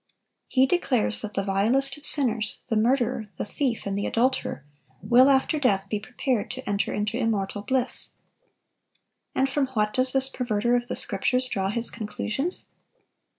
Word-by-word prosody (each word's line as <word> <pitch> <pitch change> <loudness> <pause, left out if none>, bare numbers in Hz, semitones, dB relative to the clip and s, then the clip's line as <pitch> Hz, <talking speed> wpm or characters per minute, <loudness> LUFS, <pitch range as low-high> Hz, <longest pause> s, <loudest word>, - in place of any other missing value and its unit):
He 260 0 +4
declares 265 -8 +1
that 215 -1 -6
the 195 - 0
vilest 230 +8 +1
of 295 - -6
sinners,—the 230 -3 0
murderer, 235 -1 +1
the - - -2
thief, 245 +2 -2
and 200 -1 -2
the 200 - -1
adulterer,—will 230 - +1
after 275 +3 +2
death 200 -8 +1
be 210 - -1
prepared 240 +1 -2
to 260 +1 -7
enter 200 0 0
into 210 +2 -1
immortal 210 -4 -1
bliss. 260 +4 -1 1.2
And 265 - +3
from 270 0 0
what 210 -1 +1
does 255 0 +2
this 265 0 +5
perverter 240 -3 0
of 245 0 -1
the - - -3
Scriptures 250 +5 +1
draw 195 -5 -1
his 230 +3 -2
conclusions? 230 - -3
235 Hz, 150 wpm, -26 LUFS, 210-260 Hz, 1.2 s, this